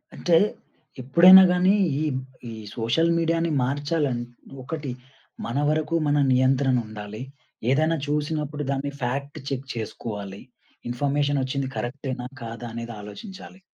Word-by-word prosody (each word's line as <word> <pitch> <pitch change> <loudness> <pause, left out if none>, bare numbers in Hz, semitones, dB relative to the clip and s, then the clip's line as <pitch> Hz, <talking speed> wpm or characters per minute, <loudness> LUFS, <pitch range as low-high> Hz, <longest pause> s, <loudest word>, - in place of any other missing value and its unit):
అంటే 170 -2 +3 0.6
ఎప్పుడైనా 175 +9 +9
గానీ 185 +2 +4 0.3
ఈ, - - 0 0.5
ఈ - - -7 0.2
సోషల్ 120 +9 +2
మీడియా‌ని 165 0 +1
మార్చాలని 145 -1 -1 0.4
ఒకటి, 145 -1 -4 0.5
మన 120 +3 -3
వరకు 155 +2 0
మన 145 0 +2 0.2
నియంత్రనుండాలి. 125 -5 0 0.5
ఏదన్నా 155 +4 +2
చూసినప్పుడు 150 0 -2
దాన్ని 140 +1 -2
ఫ్యాక్ట్ 140 +4 -3
చెక్ 135 0 -4
చేసుకోవాలి. 105 -3 -6 0.5
ఇన్ఫర్మేషన్ 145 +3 0
ఒచ్చింది 135 +1 -2
కరెక్టే‌నా? 125 0 -4 0.2
కాదా? 115 +1 -6
అనేది 115 0 -6
ఆలోచించాలి. 185 - -10
140 Hz, 110 wpm, -25 LUFS, 120-155 Hz, 0.6 s, ఎప్పుడైనా